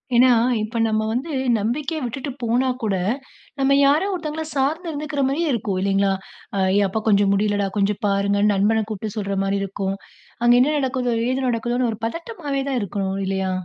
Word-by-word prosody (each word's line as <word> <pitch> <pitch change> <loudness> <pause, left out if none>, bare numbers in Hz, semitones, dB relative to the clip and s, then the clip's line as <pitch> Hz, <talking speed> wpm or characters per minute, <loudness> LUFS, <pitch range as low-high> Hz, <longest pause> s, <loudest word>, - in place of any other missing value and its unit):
ஏன்னா, 250 +2 +6 0.3
இப்போ 220 +2 -4
நம்ம 215 0 0
வந்து 265 +7 -2 0.3
நம்பிக்கையா 275 +9 -2
விட்டுட்டு 265 +3 -4
போனா 240 +3 +2 0.2
கூட, 205 -3 +1 0.6
நம்ம 275 +1 +4
யாரோ 295 +6 +4
ஒருத்தவங்கள 320 -2 -4
சார்ந்து 295 +6 0
இருந்துக்குற 295 -1 -3
மாதிரியே 305 +4 0
இருக்கும் 205 -5 -1
இல்லைங்களா? 195 0 +2 0.4
அ - - -1 0.2
"ஏயப்பா 205 +1 +1
கொஞ்சம் 200 -2 +4
முடியலடா, 205 0 +1
கொஞ்சம் 200 0 +1
பாருங்க." 200 0 +1
நண்பனை 215 +3 +2
கூப்பிட்டு 215 0 -5
சொல்ற 200 -1 -2
மாரி 195 0 0
இருக்கும். 195 0 -3 0.5
அங்க 240 0 +6
என்ன 300 +4 +2
நடக்குதோ? 255 -3 0 0.2
எது 260 0 -1
நடக்குதோன்னு 240 +1 0
ஒரு 215 - -10
பதட்டமாவே 300 - -3
தான் 260 -2 0
இருக்கணும் 195 -1 -2
இல்லையா? 190 0 -1
230 Hz, 165 wpm, -22 LUFS, 200-275 Hz, 0.6 s, ஏன்னா